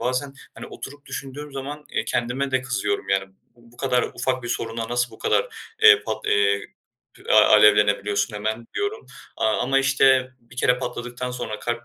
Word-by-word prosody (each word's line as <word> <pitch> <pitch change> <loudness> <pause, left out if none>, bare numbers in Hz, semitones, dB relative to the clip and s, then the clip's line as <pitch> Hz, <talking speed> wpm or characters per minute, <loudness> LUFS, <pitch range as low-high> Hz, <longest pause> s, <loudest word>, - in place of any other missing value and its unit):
bazen, 130 +3 -2 0.2
hani, - - -9
oturup 145 +1 -10
düşündüğüm 145 +2 -7
zaman, 145 +2 -6
eee, 110 - -1
kendime 125 +4 -1
de 130 -1 +1
kızıyorum. 100 -6 -2
Yani, 95 0 +1
"B - - -28 0.2
bu 120 0 -21
kadar 125 -2 +1
ufak 130 -1 -2
bir 120 - -6
soruna 115 -1 -3
nasıl 120 0 0
bu - - -15
kadar, - - +1 0.3
eee, 435 -1 +8
pat - - -5 1.1
a 110 - +8
alevlenebiliyorsun 105 0 +4
hemen?" 110 +2 -3
diyorum, 410 +2 -3 0.3
aaa, 110 -1 +1
ama 135 +2 +2
işte, 135 -1 +3
bir 120 +1 -19
kere 125 -1 +2
patladıktan 125 0 -5
sonra 120 -4 -5
kalp 120 0 -4
125 Hz, 165 wpm, -23 LUFS, 115-135 Hz, 1.1 s, eee